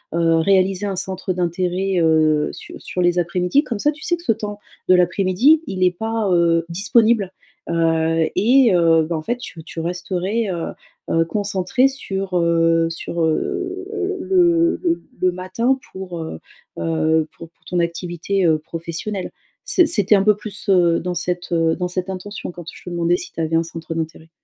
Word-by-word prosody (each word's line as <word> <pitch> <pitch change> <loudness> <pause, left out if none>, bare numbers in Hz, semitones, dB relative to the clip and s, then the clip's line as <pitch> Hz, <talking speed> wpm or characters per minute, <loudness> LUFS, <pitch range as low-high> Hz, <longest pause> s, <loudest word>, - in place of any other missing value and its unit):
heu, 165 -1 +3
réaliser 190 +3 +2
un 195 - -2
centre 190 0 -2
d'intérêt, 180 +1 -1
heu, 155 -2 +3
su - - -11
sur 180 - -4
les 175 0 +2
après-midi 180 - +1
comme 235 -7 -4
ça, 295 - +2
tu 305 +1 -14
sais 345 - 0
que 340 - -15
ce 335 - +2
temps 210 -1 -4 0.3
de 185 - +6
l'après-midi, 190 - +3
il 185 -1 -2
est 180 - +4
pas, 220 +2 -2
heu, 170 -1 +3
disponible, 205 +2 +2 0.4
heu 165 -1 +1
et 245 -1 +4
heu, 165 -2 +4
ben, 165 +2 -3
en - - -4
fait, 240 +9 -2
tu 170 -9 -9
tu 165 - -8
resterais, 180 +5 -2
heu 170 -2 -3 0.4
heu, 165 0 +3
concentrée 205 +6 +1
sur, 195 -8 -4
heu, 165 -1 +3
sur, 165 0 -4
heu, 380 - -2
le 345 -3 +3
le 340 -1 0 0.2
le 185 0 +3
matin 185 +9 -1
pour, 180 -3 -7
heu 80 - -7 0.4
heu, 160 -1 +1
pour 165 0 -11
pour - - -38
ton 180 - -1
activité, 175 +2 -1
heu, 160 -1 +4
professionnelle. 170 +5 -5 0.4
C'est 355 - +5
c'était 210 -7 +4
un 195 - +3
peu 210 -1 +4
plus, 210 0 -5
heu, 175 -3 +4
dans 180 +1 -3
cette, 175 0 -3
heu, 165 -1 +2
dans 180 -1 -2
cette 185 +1 -3
intention 190 +1 -6
quand 175 -1 -10
je - - -14
te - - -5
demandais 175 0 +1
si - - -8
tu - - -9
avais 165 0 0
un 165 - +4
centre 165 0 -7
d'intérêt. 160 0 -5
180 Hz, 185 wpm, -20 LUFS, 165-210 Hz, 0.4 s, de